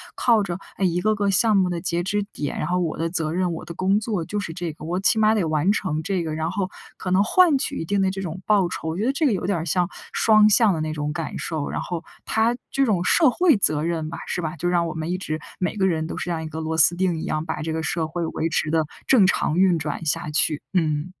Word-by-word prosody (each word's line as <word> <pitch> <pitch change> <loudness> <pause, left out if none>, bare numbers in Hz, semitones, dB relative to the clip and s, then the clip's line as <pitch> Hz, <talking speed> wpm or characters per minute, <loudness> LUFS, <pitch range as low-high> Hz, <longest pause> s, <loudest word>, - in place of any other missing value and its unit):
靠 230 -4 +3
着 175 -1 -4 0.2
一 180 -2 +1
个 215 +1 +2
个 205 -1 +1
项 215 +2 +3
目 185 -1 +2
的 170 -1 -3
截 175 -1 -1
止 205 +2 -1
点， 145 - -4
然 - - -2
后 180 - 0
我 165 -3 -1
的 165 +1 0
责 160 -3 -2
任、 180 0 0
我 160 - -6
的 170 - -7
工 190 +4 +1
作 210 -6 -2
就 205 +5 -3
是 170 -5 -5
这 175 -1 -4
个， 155 - -11
我 175 +3 -1
起 200 +3 +2
码 215 0 +4
得 210 -5 +1
完 155 +5 +2
成 160 -7 -1
这 185 -1 -1
个， 155 -1 -3
然 160 +2 -2
后， 190 -1 -2 0.3
可 180 - -5
能 190 +2 +4
换 325 - +4
取 - - -3
一 - - -2
定 200 +5 0
的 190 -1 +2
这 195 0 -5
种 180 +1 -6
报 200 -4 +3
酬。 160 - -4
我 160 - -3
觉 205 - -1
得 - - +3
这 295 +3 0
个 270 - +4
有 185 - -2
点 195 -3 +1
儿 165 - -4
像 175 +2 +1 0.2
双 215 -1 +5
向 220 -1 +5
的 160 -3 -1
那 155 0 -2
种 150 -1 -3
感 165 0 -4
受， 155 -3 -3
然 - - -3
后 175 -2 -4 0.2
它 225 +2 +1
这 275 0 +1
种 195 -6 +1
社 315 - +4
会 330 - +4
责 155 -6 +1
任 165 -2 -2
吧 - - -7
是 - - -2
吧， 160 -1 -3
就 175 +3 -1
让 175 -1 +2
我 160 - -4
们 160 +1 -4
一 180 - -1
直 155 -4 -4 0.2
每 180 - -2
个 190 -1 +2
人 160 -3 0
都 - - -5
是 - - -4
这 175 - -3
样 160 -1 -2
一 - - -5
个 155 +1 -6
螺 160 0 -2
丝 165 +2 +5
钉 180 -2 0
一 - - -5
样， 155 0 -2
把 160 -1 -4
这 160 0 -2
个 160 - -2
社 160 +1 -1
会 170 +1 -3
维 160 0 -2
持 155 -1 0
地 160 0 +1 0.2
正 235 -8 +6
常 175 -3 +1
运 185 -3 +4
转 150 +2 -4
下 160 +1 -1
去。 150 0 +1
嗯。 155 -1 0
175 Hz, 310 characters per minute, -23 LUFS, 160-195 Hz, 0.3 s, 正